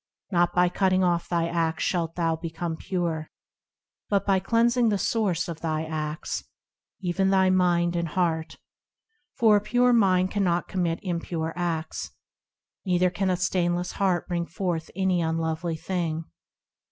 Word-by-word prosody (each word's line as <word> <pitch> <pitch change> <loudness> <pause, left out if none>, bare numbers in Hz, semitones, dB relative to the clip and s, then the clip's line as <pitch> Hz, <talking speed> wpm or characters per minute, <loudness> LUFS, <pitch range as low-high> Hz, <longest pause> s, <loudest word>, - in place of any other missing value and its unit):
Not 175 -1 +2
by 180 0 +5
cutting 185 +1 +2
off 175 -1 +1
thy 170 -1 +1
acts 165 -1 -1
shalt 165 -3 -1
thou 165 -2 +1
become 165 0 -4
pure, 165 -3 -3 0.8
But 200 -1 +1
by 195 -1 +3
cleansing 235 +4 +2
the 205 - +1
source 195 -5 0
of 165 -2 -6
thy 160 -2 -1
acts, 155 -1 -4 0.6
Even 190 +1 +1
thy 190 -1 +4
mind 175 -2 +2
and 170 -1 0
heart, 160 -1 -1 0.8
For 220 -3 +5
a - - 0
pure 245 +4 +3
mind 185 -4 +3
cannot 180 -4 +1
commit 175 -3 -1
impure 165 -3 -3
acts, 165 -3 -3 0.7
Neither 180 -1 +2
can 190 +1 -1
a 180 - +1
stainless 175 -1 0
heart 185 -3 0
bring 170 -1 -2
forth 175 -4 -3
any 190 -2 +1
unlovely 160 +1 -1
thing. 165 -2 -3
175 Hz, 145 wpm, -26 LUFS, 165-190 Hz, 0.8 s, by